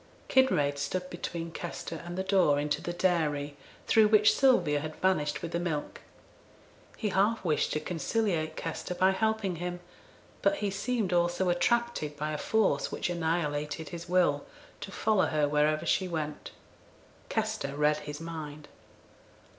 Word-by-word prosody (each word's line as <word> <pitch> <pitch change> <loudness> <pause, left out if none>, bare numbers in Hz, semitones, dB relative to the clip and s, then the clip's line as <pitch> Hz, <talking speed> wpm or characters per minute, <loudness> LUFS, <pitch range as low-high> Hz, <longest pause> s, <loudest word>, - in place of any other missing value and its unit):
Kinraid 145 - +3
stood 180 +6 -3
between 170 -1 -5
Kester 165 -1 -6
and 175 +1 -6
the 190 - 0
door 185 -7 +3
into 150 0 -1
the 175 - -3
dairy, 155 -5 0 0.3
through 220 -1 +5
which 210 0 +5
Sylvia 180 - +4
had 155 +1 -6
vanished 150 -6 0
with 170 - -4
the 170 - -1
milk. 160 -4 -3 1.0
He 215 - -1
half 200 +2 +1
wished 155 -3 +1
to 155 - 0
conciliate 165 0 -1
Kester 165 +2 -4
by 185 +1 +4
helping 220 -3 0
him, 175 +1 -4 0.6
but 300 - +3
he 205 -8 -2
seemed 200 -1 -1
also 175 +1 +2
attracted, 175 -5 0
by 150 +1 -2
a 150 - -3
force 210 -10 +1
which - - -2
annihilated 160 -2 -2
his 170 -1 -8
will, 175 -6 +3 0.4
to 195 - -7
follow 215 -1 +2
her 150 -1 +1
wherever 150 +1 +2
she 190 - +1
went. 155 -3 -4 0.8
Kester 140 0 -2
read 150 +1 +3
his 150 -1 -7
mind. 155 -3 -7
170 Hz, 150 wpm, -29 LUFS, 150-190 Hz, 1.0 s, through